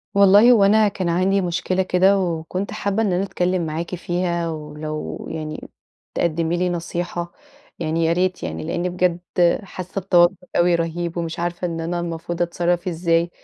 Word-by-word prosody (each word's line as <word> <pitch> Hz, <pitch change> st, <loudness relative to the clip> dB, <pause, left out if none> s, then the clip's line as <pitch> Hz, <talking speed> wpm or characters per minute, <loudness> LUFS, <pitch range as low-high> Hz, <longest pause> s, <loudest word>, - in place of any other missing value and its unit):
والله 200 Hz, +4 st, +7 dB
هو 220 Hz, -5 st, +5 dB
أنا 215 Hz, +2 st, +5 dB
كان 185 Hz, -3 st, -2 dB
عندي 190 Hz, +3 st, +2 dB
مشكلة 180 Hz, +1 st, 0 dB
كده، 190 Hz, +2 st, +3 dB
وكنت 180 Hz, +2 st, -3 dB
حابّة 200 Hz, +2 st, -1 dB
إن 195 Hz, -4 st, +1 dB
أنا 185 Hz, +2 st, +1 dB
أتكلّم 180 Hz, -2 st, -1 dB
معاكِ 165 Hz, +3 st, -3 dB
فيها، 175 Hz, -1 st, -1 dB
ولو 155 Hz, 0 st, -6 dB
يعني 155 Hz, -1 st, -6 dB, 0.4 s
تقدمي 170 Hz, 0 st, 0 dB
لي 180 Hz, +1 st, +1 dB
نصيحة، 175 Hz, 0 st, -3 dB, 0.5 s
يعني 165 Hz, 0 st, 0 dB
يا 165 Hz, -, +3 dB
ريت 180 Hz, +1 st, 0 dB
يعني 80 Hz, -1 st, -4 dB
لأني 175 Hz, -, -2 dB
بجد 180 Hz, -1 st, 0 dB, 0.4 s
حاسّة 185 Hz, 0 st, -6 dB
بتوتّر 175 Hz, 0 st, +4 dB, 0.2 s
أوي 175 Hz, 0 st, +4 dB
رهيب 170 Hz, +1 st, -2 dB
ومش 165 Hz, -1 st, -3 dB
عارفة 175 Hz, +1 st, -2 dB
إن 165 Hz, -1 st, -4 dB
أنا 170 Hz, +1 st, -2 dB
المفروض 170 Hz, 0 st, -4 dB
أتصرّف 175 Hz, +1 st, 0 dB
إزاي، 170 Hz, 0 st, +1 dB
175 Hz, 160 wpm, -21 LUFS, 165-185 Hz, 0.5 s, والله